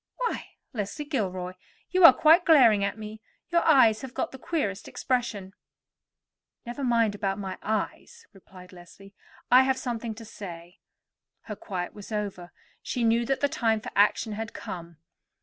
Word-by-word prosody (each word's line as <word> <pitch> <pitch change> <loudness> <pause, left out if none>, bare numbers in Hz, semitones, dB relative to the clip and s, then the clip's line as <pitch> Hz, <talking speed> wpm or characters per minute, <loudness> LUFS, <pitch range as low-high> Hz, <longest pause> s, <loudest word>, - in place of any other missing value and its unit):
Why, - - -4 0.2
Leslie 225 +7 -4
Gilroy, 185 - -3 0.4
you 370 +1 +2
are - - +12
quite 325 +3 +5
glaring 240 - +5
at 200 +1 -2
me; 215 0 -9 0.3
your 340 0 +3
eyes 235 -8 +5
have 265 -1 -9
got - - -2
the 265 - -10
queerest 215 - -3
expression." 230 -7 -3 1.1
"Never 240 +4 -6
mind 230 -4 +2
about 195 -1 -2
my 190 -2 -6
eyes," 455 - -4
replied 185 -1 -15
Leslie. 185 +3 -15 0.4
"I 250 +1 +8
have 265 0 +1
something 235 -3 -4
to 225 +1 -10
say." 175 -5 -10 0.6
Her 210 - -7
quiet 185 -3 -5
was 205 +1 -11
over; 200 -5 -4 0.3
she 245 - -3
knew 230 +1 +2
that 270 -1 -1
the 285 - +3
time 225 -5 0
for - - -8
action 210 +2 +3
had 225 +2 -6
come. 170 -2 -8
220 Hz, 160 wpm, -27 LUFS, 195-255 Hz, 1.1 s, are